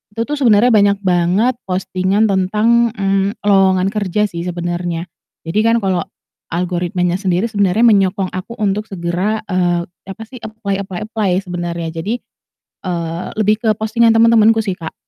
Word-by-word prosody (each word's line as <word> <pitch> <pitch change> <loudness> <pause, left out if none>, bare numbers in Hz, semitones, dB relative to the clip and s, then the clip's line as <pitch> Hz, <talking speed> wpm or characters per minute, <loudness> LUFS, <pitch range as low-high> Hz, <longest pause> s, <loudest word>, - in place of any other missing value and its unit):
itu 230 - 0
tuh 290 +3 -4
sebenernya 240 -1 +4
banyak 200 -2 +4
banget 185 +7 +1
postingan 185 +2 0
tentang, 215 +4 +2
mmm, 195 0 0
lowongan 195 -1 +3
kerja 210 -1 -1
sih 170 +1 -5
sebenernya. 175 -1 -3 0.4
Jadi 170 +6 -1
kan 230 +1 +3
kalau 185 -2 0 0.4
algoritmanya 180 +1 -1
sendiri 190 +3 0
sebenernya 200 +1 +2
menyokong 195 -4 +3
aku 185 +5 -6
untuk 210 -1 -1
segera, 190 +4 -2
eee, 175 -1 +1 0.2
apa 195 +4 -7
sih 250 +3 -12
apply 215 -3 -4
apply 185 -2 -5
apply 215 -3 -1
sebenarnya. 175 -2 -4
Jadi, 210 +8 -2 0.7
eee, 170 -2 -3
lebih 215 0 +1
ke 225 - +2
postingan 230 +2 +2
teman-temanku 225 -1 +5
sih, 205 -4 -1
Kak. 165 -3 -8
195 Hz, 145 wpm, -17 LUFS, 180-220 Hz, 0.7 s, teman-temanku